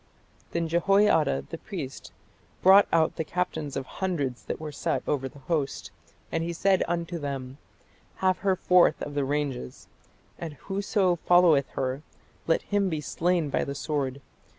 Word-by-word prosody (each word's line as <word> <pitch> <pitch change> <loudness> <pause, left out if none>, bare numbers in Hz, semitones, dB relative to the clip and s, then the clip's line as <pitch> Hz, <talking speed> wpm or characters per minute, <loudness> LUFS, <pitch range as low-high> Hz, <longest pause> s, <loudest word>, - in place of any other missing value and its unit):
"Then 170 -1 -1
Jehoiada 170 - +3
the - - -5
priest 155 -10 -7 0.5
brought 195 +2 +8
out 160 -1 +2
the - - 0
captains 160 -4 -3
of 135 - -3
hundreds 145 -8 -3
that - - -4
were 155 -1 -6
set 145 - -2
over 135 -2 -1
the 145 - -16
host, 150 -5 -2 0.4
and 165 +1 -2
said 190 +2 +3
unto 170 0 -2
them, 135 -2 -5 0.6
Have 185 -1 +1
her 195 -2 +2
forth 180 -1 +4
of 145 - -5
the 145 -1 0
ranges: 140 - -3 0.5
and 165 -3 -5
whoso 195 - 0
followeth 170 -5 +4
her, 130 +2 -2 0.5
let 165 - +2
him 205 -2 +1
be 160 -3 -2
slain 165 +1 0
by - - +1
the 140 - -4
sword. 140 -2 -2
160 Hz, 150 wpm, -27 LUFS, 140-180 Hz, 0.6 s, brought